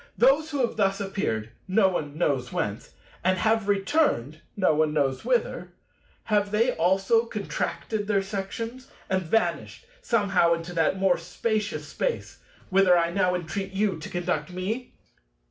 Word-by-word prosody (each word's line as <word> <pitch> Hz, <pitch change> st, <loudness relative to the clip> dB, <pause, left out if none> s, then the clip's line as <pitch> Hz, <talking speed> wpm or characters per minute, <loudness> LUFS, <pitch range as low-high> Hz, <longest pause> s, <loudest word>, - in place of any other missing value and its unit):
Those 275 Hz, +6 st, +4 dB
who 285 Hz, -3 st, -1 dB
have 235 Hz, -, -7 dB
thus 195 Hz, -1 st, +2 dB
appeared—no 195 Hz, -, 0 dB
one 155 Hz, -5 st, -3 dB
knows 135 Hz, -7 st, 0 dB
whence—and 125 Hz, -, -3 dB
have 220 Hz, +1 st, +1 dB
returned—no 195 Hz, -, +1 dB
one 155 Hz, 0 st, +2 dB
knows 135 Hz, -3 st, 0 dB
whither—have 210 Hz, -, -2 dB
they 225 Hz, +4 st, +2 dB
also 195 Hz, +7 st, +2 dB
contracted 210 Hz, 0 st, -3 dB
their 200 Hz, -2 st, +2 dB
sections 220 Hz, +6 st, -5 dB, 0.2 s
and 190 Hz, 0 st, +2 dB
vanished 225 Hz, -, -1 dB, 0.2 s
somehow 195 Hz, -, +3 dB
into 165 Hz, +1 st, -7 dB
that 165 Hz, +3 st, +1 dB
more 190 Hz, -2 st, +2 dB
Spacious 215 Hz, +5 st, -2 dB
Space, -, -, -3 dB, 0.3 s
whither 185 Hz, -2 st, +5 dB
I 170 Hz, 0 st, +1 dB
now 180 Hz, -1 st, +2 dB
entreat 190 Hz, +3 st, -4 dB
you 195 Hz, -3 st, 0 dB
to 155 Hz, -, -7 dB
conduct 175 Hz, -3 st, -2 dB
me? 205 Hz, +8 st, -4 dB
195 Hz, 130 wpm, -26 LUFS, 170-215 Hz, 0.3 s, whither